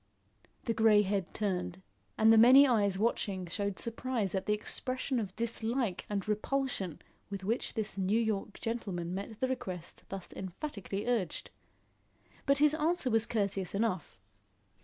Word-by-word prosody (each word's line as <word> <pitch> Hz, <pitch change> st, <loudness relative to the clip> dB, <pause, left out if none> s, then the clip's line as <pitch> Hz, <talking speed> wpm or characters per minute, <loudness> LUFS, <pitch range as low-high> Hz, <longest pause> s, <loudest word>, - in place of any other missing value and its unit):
The 230 Hz, -, 0 dB
grey 220 Hz, -2 st, +5 dB
head 195 Hz, -2 st, -1 dB
turned, 185 Hz, -, -2 dB, 0.4 s
and 220 Hz, +1 st, +6 dB
the -, -, +6 dB
many 260 Hz, +5 st, +9 dB
eyes 205 Hz, -6 st, +3 dB
watching 200 Hz, -3 st, 0 dB
showed 200 Hz, +2 st, -2 dB
surprise 230 Hz, -3 st, -1 dB
at 190 Hz, -1 st, -2 dB
the 210 Hz, -, +3 dB
expression 255 Hz, +4 st, -2 dB
of 195 Hz, -4 st, -4 dB
dislike 230 Hz, -1 st, -1 dB
and 200 Hz, -2 st, -2 dB
repulsion 215 Hz, -, -1 dB, 0.3 s
with 200 Hz, -1 st, -5 dB
which 225 Hz, +5 st, -1 dB
this 215 Hz, -3 st, -3 dB
New 195 Hz, +4 st, +2 dB
York 215 Hz, -3 st, -2 dB
gentleman 190 Hz, -7 st, -3 dB
met 200 Hz, +3 st, -5 dB
the 260 Hz, -, +1 dB
request 185 Hz, -9 st, -5 dB
thus 195 Hz, -2 st, -6 dB
emphatically 195 Hz, -, -5 dB
urged. 230 Hz, -8 st, -1 dB, 1.0 s
But 280 Hz, 0 st, +4 dB
his 300 Hz, +1 st, +5 dB
answer 315 Hz, -3 st, +1 dB
was 225 Hz, 0 st, +3 dB
courteous 200 Hz, -4 st, -1 dB
enough. 200 Hz, -5 st, -1 dB
210 Hz, 145 wpm, -32 LUFS, 195-235 Hz, 1.0 s, many